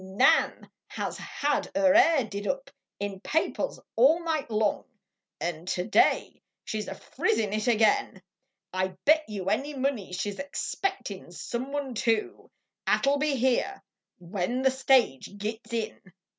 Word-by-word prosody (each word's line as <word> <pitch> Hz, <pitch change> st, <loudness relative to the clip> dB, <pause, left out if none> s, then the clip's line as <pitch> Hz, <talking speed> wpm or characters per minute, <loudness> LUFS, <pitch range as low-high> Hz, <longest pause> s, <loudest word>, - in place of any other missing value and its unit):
Xan 190 Hz, +1 st, +3 dB, 0.2 s
has -, -, -4 dB
had 290 Hz, 0 st, -1 dB
er 285 Hz, -1 st, +5 dB
hair 330 Hz, -4 st, +6 dB
did 205 Hz, -1 st, -5 dB
up 275 Hz, 0 st, -3 dB, 0.3 s
In 200 Hz, -1 st, -4 dB
papers 315 Hz, +10 st, -1 dB, 0.2 s
all 305 Hz, +9 st, +5 dB
night 315 Hz, -6 st, -1 dB
long; 215 Hz, -1 st, +1 dB, 0.6 s
Xd 170 Hz, 0 st, -4 dB
today 185 Hz, +4 st, +2 dB, 0.2 s
she 215 Hz, -, -3 dB
s 210 Hz, -, -5 dB
a -, -, -5 dB
frizzin 220 Hz, -, -1 dB
it 215 Hz, +1 st, -1 dB
agin; 220 Hz, -4 st, +3 dB, 0.5 s
I 185 Hz, 0 st, -1 dB
bet 310 Hz, +1 st, +5 dB
you 195 Hz, -2 st, -2 dB
any 285 Hz, +7 st, -1 dB
money 260 Hz, -8 st, -1 dB
she 190 Hz, +3 st, -2 dB
s 195 Hz, -, -10 dB
expectin 285 Hz, -, -3 dB
some 240 Hz, +9 st, -5 dB
one, 285 Hz, -3 st, -3 dB
too, 225 Hz, -1 st, -1 dB, 0.4 s
At -, -, +3 dB
11 280 Hz, +1 st, +3 dB
be 300 Hz, -1 st, +1 dB
here 260 Hz, +10 st, 0 dB, 0.3 s
when 190 Hz, +8 st, -2 dB
the 265 Hz, -, +5 dB
stage 260 Hz, -, +2 dB
gits 220 Hz, +3 st, -5 dB
in. 230 Hz, -2 st, -3 dB
235 Hz, 145 wpm, -28 LUFS, 200-280 Hz, 0.6 s, hair